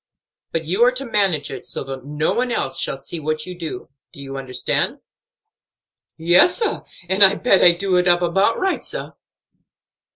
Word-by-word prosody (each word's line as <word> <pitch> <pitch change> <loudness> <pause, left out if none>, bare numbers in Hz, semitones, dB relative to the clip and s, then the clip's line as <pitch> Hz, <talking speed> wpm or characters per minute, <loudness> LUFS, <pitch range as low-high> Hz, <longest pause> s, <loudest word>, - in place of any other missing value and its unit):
But 165 -1 -3
you 190 +9 +1
are 250 - +5
to 265 +2 -4
manage 195 - 0
it - - -7
so - - -5
that 135 -1 -8
no 150 +2 -1
one 250 0 -1
else - - -2
shall - - -1
see 150 +5 -8
what 155 0 -3
you 180 - -8
do. 165 -3 -7 0.2
Do - - -14
you 135 -1 -8
understand?" 130 -2 -2 1.2
"Yes, 175 - +4
sah, 455 - -2 0.2
and 190 +3 +4
I 195 +1 +7
bet 215 -5 +3
I 175 - +8
do 185 +1 0
it 180 0 +2
up 175 0 +3
about 195 +6 +1
right, 380 0 -1
sah." - - -4
175 Hz, 185 wpm, -20 LUFS, 155-200 Hz, 1.2 s, I